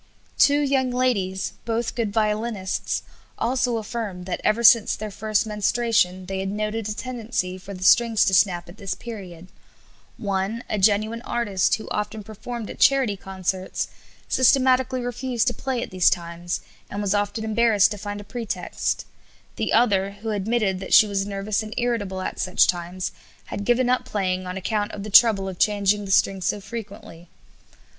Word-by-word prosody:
Two 285 Hz, +1 st, +5 dB
young 270 Hz, -2 st, +1 dB
ladies, 225 Hz, -7 st, 0 dB
both 230 Hz, 0 st, -2 dB
good 230 Hz, -4 st, -2 dB
violinists, 210 Hz, -2 st, -1 dB, 0.3 s
also 245 Hz, 0 st, 0 dB
affirmed 210 Hz, -5 st, -5 dB
that 180 Hz, -, -4 dB
ever 230 Hz, +2 st, +2 dB
since 230 Hz, -1 st, +6 dB
their 215 Hz, 0 st, -6 dB
first 215 Hz, +2 st, 0 dB
menstruation 210 Hz, -3 st, +1 dB
they 190 Hz, +1 st, -4 dB
had 190 Hz, 0 st, -2 dB
noted 215 Hz, +1 st, -2 dB
a -, -, -1 dB
tendency 225 Hz, -6 st, -3 dB
for 190 Hz, +1 st, -9 dB
the 185 Hz, -, -7 dB
strings 230 Hz, +2 st, +5 dB
to 195 Hz, -, +1 dB
snap 180 Hz, -2 st, +3 dB
at 175 Hz, +4 st, -13 dB
this 195 Hz, -2 st, -4 dB
period; 185 Hz, -7 st, -9 dB, 0.7 s
one, 200 Hz, +3 st, -2 dB
a 215 Hz, -, -2 dB
genuine 215 Hz, +3 st, +2 dB
artist, 205 Hz, -7 st, +1 dB
who 220 Hz, -, -9 dB
often 210 Hz, +1 st, -3 dB
performed 220 Hz, +2 st, -7 dB
at -, -, -9 dB
charity 260 Hz, -5 st, +4 dB
concerts, 190 Hz, -1 st, -3 dB, 0.4 s
systematically 260 Hz, 0 st, +3 dB
refused 245 Hz, 0 st, -1 dB
to 245 Hz, -, +1 dB
play 260 Hz, -2 st, -3 dB
at -, -, -8 dB
these 185 Hz, -2 st, +4 dB
times, 170 Hz, 0 st, -3 dB, 0.3 s
and 200 Hz, -, -5 dB
was 205 Hz, -1 st, 0 dB
often 205 Hz, +1 st, -1 dB
embarrassed 220 Hz, -2 st, +3 dB
to 210 Hz, -, -4 dB
find 205 Hz, +1 st, -5 dB
a -, -, -8 dB
pretext; 205 Hz, -4 st, -3 dB, 0.5 s
the -, -, -2 dB
other, 200 Hz, -4 st, +3 dB
who 225 Hz, -, -2 dB
admitted 205 Hz, -2 st, 0 dB
that 190 Hz, -, +2 dB
she -, -, +8 dB
was 200 Hz, -1 st, -2 dB
nervous 200 Hz, +1 st, -2 dB
and 215 Hz, +1 st, -7 dB
irritable 210 Hz, -6 st, -1 dB
at -, -, -4 dB
such 185 Hz, -1 st, +3 dB
times, 175 Hz, +1 st, -2 dB, 0.3 s
had 200 Hz, -, -5 dB
given 245 Hz, +2 st, +3 dB
up 250 Hz, 0 st, +2 dB
playing 185 Hz, -6 st, -2 dB
on 180 Hz, +1 st, -4 dB
account 205 Hz, +2 st, -1 dB
of 200 Hz, -, -6 dB
the 215 Hz, -, -7 dB
trouble 205 Hz, -3 st, +6 dB
of 185 Hz, -2 st, -7 dB
changing 205 Hz, 0 st, +2 dB
the -, -, -8 dB
strings 190 Hz, -1 st, +2 dB
so 210 Hz, -, 0 dB
frequently. 195 Hz, -6 st, -9 dB
210 Hz, 170 wpm, -24 LUFS, 190-235 Hz, 0.7 s, she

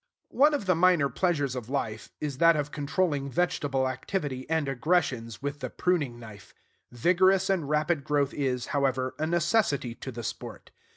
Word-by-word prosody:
One 295 Hz, +2 st, +4 dB
of 245 Hz, -, -3 dB
the 185 Hz, -, +3 dB
minor 170 Hz, -4 st, +3 dB
pleasures 145 Hz, -8 st, 0 dB
of 125 Hz, -2 st, -6 dB
life 110 Hz, -6 st, -3 dB
is 140 Hz, -3 st, -4 dB
that 165 Hz, -1 st, +6 dB
of 145 Hz, -1 st, -2 dB
controlling 145 Hz, -1 st, -1 dB
vegetable 140 Hz, -4 st, 0 dB
activity 130 Hz, 0 st, -4 dB
and 160 Hz, -3 st, 0 dB
aggressions 135 Hz, -4 st, -1 dB
with 145 Hz, 0 st, -3 dB
the 130 Hz, -2 st, -4 dB
pruning 150 Hz, -9 st, -1 dB
knife. 110 Hz, -4 st, -13 dB, 0.4 s
Vigorous 185 Hz, +8 st, +3 dB
and 170 Hz, -7 st, -1 dB
rapid 155 Hz, 0 st, +1 dB
growth 145 Hz, -1 st, 0 dB
is, 130 Hz, -3 st, -1 dB
however, 130 Hz, -2 st, 0 dB
a 155 Hz, -, 0 dB
necessity 170 Hz, -, +1 dB
to 130 Hz, -, -8 dB
the 120 Hz, -1 st, -7 dB
sport. -, -, -7 dB
145 Hz, 165 wpm, -28 LUFS, 130-175 Hz, 0.4 s, that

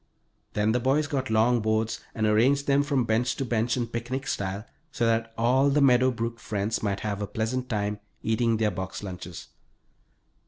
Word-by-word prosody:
Then 105 Hz, +1 st, +2 dB
the 125 Hz, -, +2 dB
boys 135 Hz, +5 st, +2 dB
got 135 Hz, -3 st, -2 dB
long 115 Hz, +2 st, +3 dB
boards 110 Hz, 0 st, 0 dB, 0.2 s
and 110 Hz, -, 0 dB
arranged 125 Hz, +7 st, +3 dB
them 140 Hz, 0 st, +3 dB
from 140 Hz, -3 st, +1 dB
bench 115 Hz, +2 st, +1 dB
to 135 Hz, -, -2 dB
bench 120 Hz, 0 st, 0 dB
in 120 Hz, -, 0 dB
picnic 120 Hz, +4 st, -4 dB
style, 100 Hz, -1 st, -3 dB, 0.3 s
so 120 Hz, -, 0 dB
that 115 Hz, 0 st, +1 dB
all 130 Hz, +4 st, +3 dB
the 145 Hz, +2 st, +2 dB
Meadow 130 Hz, -2 st, +5 dB
Brook 115 Hz, -1 st, -3 dB
friends 105 Hz, +1 st, -2 dB
might 100 Hz, -2 st, -1 dB
have 105 Hz, -1 st, -3 dB
a 100 Hz, -, -2 dB
pleasant 120 Hz, +5 st, -2 dB
time 105 Hz, -2 st, -1 dB, 0.2 s
eating 115 Hz, 0 st, +1 dB
their 110 Hz, -1 st, +1 dB
box 95 Hz, +2 st, -5 dB
lunches. 90 Hz, -2 st, -8 dB
115 Hz, 185 wpm, -27 LUFS, 105-130 Hz, 0.3 s, Meadow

